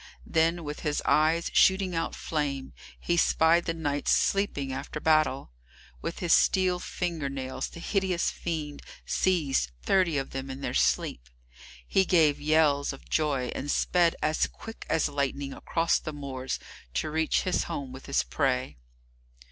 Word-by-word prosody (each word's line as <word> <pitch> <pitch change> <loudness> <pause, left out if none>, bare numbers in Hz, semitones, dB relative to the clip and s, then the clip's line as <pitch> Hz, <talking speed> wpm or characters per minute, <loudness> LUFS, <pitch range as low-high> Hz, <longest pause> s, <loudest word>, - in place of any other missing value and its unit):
Then, 165 +1 +1
with 150 0 -5
his 150 -2 -1
eyes 160 +2 +2
shooting 190 -1 +4
out 165 0 -2
flame, 140 -4 -3 0.3
he 170 - 0
spied 170 0 +4
the 165 - -1
knights 145 -3 -2
sleeping 145 -9 +1
after 155 - -5
battle. 155 - +2 0.5
With 170 - -4
his 175 -2 +2
steel 185 -2 +3
finger 170 -6 -3
nails 130 -1 -4
the - - -11
hideous 185 -1 0
fiend 155 -4 -4 0.2
seized 150 - +1
thirty 180 -5 +2
of 135 - -3
them 135 0 -5
in 135 +1 -7
their - - -3
sleep. - - 0 0.6
He 190 - +3
gave 160 -6 +3
yells 150 -2 +2
of 135 - -14
joy, 140 -5 0
and 145 - -5
sped 175 +2 +2
as 155 +1 +2
quick 225 0 -11
as 160 - +2
lightning 140 -1 -2
across 165 0 0
the 155 - -6
moors, 135 -3 -4 0.4
to 150 - -1
reach 160 0 +1
his 185 - 0
home 140 -6 -5
with 130 +1 -10
his 140 - +1
prey. 130 - -1
155 Hz, 155 wpm, -28 LUFS, 140-170 Hz, 0.6 s, shooting